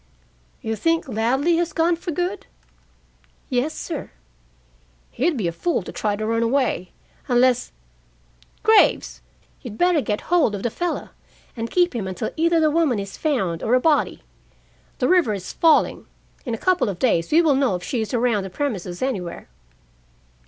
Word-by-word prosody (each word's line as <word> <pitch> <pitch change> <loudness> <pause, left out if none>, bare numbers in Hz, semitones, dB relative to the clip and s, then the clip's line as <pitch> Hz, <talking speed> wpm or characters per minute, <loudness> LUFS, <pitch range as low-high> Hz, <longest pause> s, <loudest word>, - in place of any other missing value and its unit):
"You 225 0 -2
think 330 +5 0
Ladley 265 +8 +1
has 345 0 -1
gone 335 +1 +2
for 345 +2 -7
good?" 355 +5 -3 1.0
"Yes, 260 +5 0
sir." 320 -5 -5 1.0
"He'd 305 +4 0
be 200 -7 -1
a - - -1
fool 280 - -1
to - - -8
try 210 -1 -1
to 215 +1 -4
run 230 +1 0
away, 230 -6 0 0.4
unless 250 0 +2 0.9
Graves, - - +3 0.4
you'd 220 -4 -8
better 350 -1 +3
get 210 -4 -2
hold 320 -11 +2
of 195 - -6
the 235 - -1
fellow, 350 +6 -3 0.5
and 230 -1 -4
keep 355 -6 +2
him 205 -5 -3
until 185 -1 -4
either 335 +1 +2
the 310 -1 +3
woman 310 -7 +2
is 200 -1 -5
found 195 - -1
or 240 - +2
a - - +4
body. 305 +2 +1 0.7
The - - +1
river 345 - +3
is 185 -2 -7
falling. 325 -2 +2 0.4
In 235 - -1
a - - -13
couple 365 - +3
of 190 - -4
days 170 -9 +1
we 330 +3 +5
will 310 -3 +4
know 265 -7 +2
if 180 - -6
she 235 +4 -2
is 220 - -4
around 240 -4 +1
the 190 - -6
premises 190 -6 -3
anywhere." 185 - -4
250 Hz, 170 wpm, -22 LUFS, 210-325 Hz, 1.0 s, we